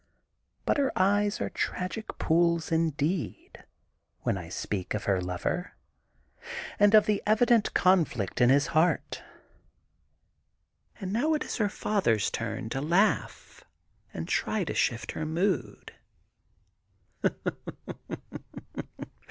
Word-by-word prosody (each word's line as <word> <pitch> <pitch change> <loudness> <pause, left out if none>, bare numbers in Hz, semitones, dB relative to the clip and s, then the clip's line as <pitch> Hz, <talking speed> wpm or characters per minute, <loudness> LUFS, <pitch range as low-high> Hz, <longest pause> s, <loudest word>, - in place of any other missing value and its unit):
But - - +2
her 275 -2 +2
eyes 205 +2 +2
are - - -2
tragic 185 +5 -3
poojs, 170 0 +2
indeed, 160 +1 -1 0.6
when - - 0
I 90 -3 -7
speak 95 +2 -3
of 105 - -3
her 95 -2 +1
lover, 90 0 -3 1.1
and 205 +1 +6
of 215 - +7
the 210 -1 +1
evident 225 +1 +3
conflict 160 - +2
in 120 - +6
his 140 +2 +5
heart. 165 +3 +1 1.8
And 190 -2 -4
now 300 +8 +2
it 300 - -1
is - - -4
her 210 -4 +1
father's 150 - +1
turn 115 +1 -4
to 135 - -2
laugh 175 +8 0 0.5
and - - -5
try 215 -3 0
to - - -3
shift 115 -1 0
her - - -4
mood. 175 +5 -1
170 Hz, 110 wpm, -28 LUFS, 125-205 Hz, 1.8 s, of